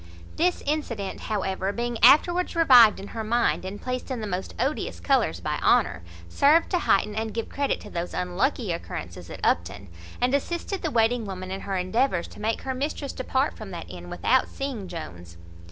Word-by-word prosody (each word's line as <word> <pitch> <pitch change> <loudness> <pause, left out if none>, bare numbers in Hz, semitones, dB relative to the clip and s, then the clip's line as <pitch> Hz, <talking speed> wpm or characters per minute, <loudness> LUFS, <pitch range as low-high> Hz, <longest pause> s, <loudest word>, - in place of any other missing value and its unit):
This 355 +2 +1
incident, 245 -10 -2
however, 195 -2 -2
being 235 +1 -3
afterwards 345 +9 +5
revived 250 -10 +7
in 195 - -8
her 225 - -5
mind, 235 -1 +1
and 190 +2 -6
placed 255 +1 -4
in 255 -3 -3
the 215 - -4
most 190 -2 -4
odious 275 +4 -2
colours 270 -5 +1
by - - -2
Honour, 80 - +3 0.3
served 295 - +3
to 360 - +2
heighten 210 - +2
and 220 0 -3
give 230 - -3
credit 280 0 -1
to - - -11
those 170 +1 -4
unlucky 190 +4 -1
occurrences 170 - -6
at - - -8
Upton, 100 -1 0 0.3
and 250 +2 +1
assisted 345 +7 -2
the 320 - -1
waiting 230 -2 +2
woman 185 -1 -6
in 195 0 -4
her 195 -1 -3
endeavours 185 0 0
to - - -12
make 220 +2 -1
her 265 - -2
mistress 280 +1 -3
depart 260 +2 -1
from - - -9
that - - -7
inn - - -9
without - - +2
seeing 260 -8 -5
Jones. 85 - -8
230 Hz, 185 wpm, -25 LUFS, 190-275 Hz, 0.3 s, revived